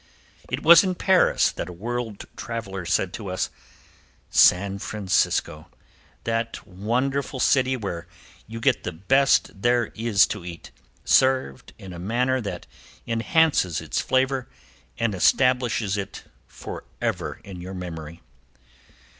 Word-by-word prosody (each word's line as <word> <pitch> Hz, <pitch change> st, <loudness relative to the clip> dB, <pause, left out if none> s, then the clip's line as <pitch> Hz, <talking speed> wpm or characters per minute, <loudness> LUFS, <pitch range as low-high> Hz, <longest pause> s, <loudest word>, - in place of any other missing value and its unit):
It 125 Hz, +4 st, -3 dB
was 170 Hz, +2 st, +9 dB
in 185 Hz, -1 st, -1 dB
Paris 190 Hz, 0 st, +3 dB
that 85 Hz, -, -6 dB
a -, -, -8 dB
world 115 Hz, +2 st, -5 dB
traveler 100 Hz, -6 st, -5 dB
said 90 Hz, +1 st, 0 dB
to 105 Hz, -, -6 dB
us: 90 Hz, -, -2 dB, 0.8 s
"San 100 Hz, +2 st, +4 dB
Francisco! 95 Hz, -7 st, -1 dB, 0.6 s
That 115 Hz, 0 st, -3 dB
wonderful 125 Hz, +8 st, -2 dB
city 130 Hz, 0 st, +3 dB
where 95 Hz, -7 st, -5 dB, 0.4 s
you 115 Hz, +1 st, -7 dB
get 125 Hz, +2 st, +1 dB
the -, -, -4 dB
best 120 Hz, +2 st, +2 dB
there 120 Hz, 0 st, +2 dB
is 110 Hz, -2 st, +3 dB
to -, -, -9 dB
eat, 85 Hz, -1 st, -9 dB, 0.3 s
served 130 Hz, -, +2 dB
in 95 Hz, -2 st, -10 dB
a 85 Hz, -, -8 dB
manner 125 Hz, +7 st, 0 dB
that 100 Hz, -, -6 dB, 0.4 s
enhances 115 Hz, -, +2 dB
its -, -, -2 dB
flavor 130 Hz, -1 st, 0 dB, 0.5 s
and 115 Hz, -2 st, 0 dB
establishes 120 Hz, 0 st, +2 dB
it 100 Hz, -2 st, -6 dB, 0.2 s
forever -, -, -5 dB
in 95 Hz, -3 st, -9 dB
your 95 Hz, +2 st, -7 dB
memory." 85 Hz, -3 st, -7 dB
115 Hz, 125 wpm, -24 LUFS, 95-130 Hz, 0.8 s, was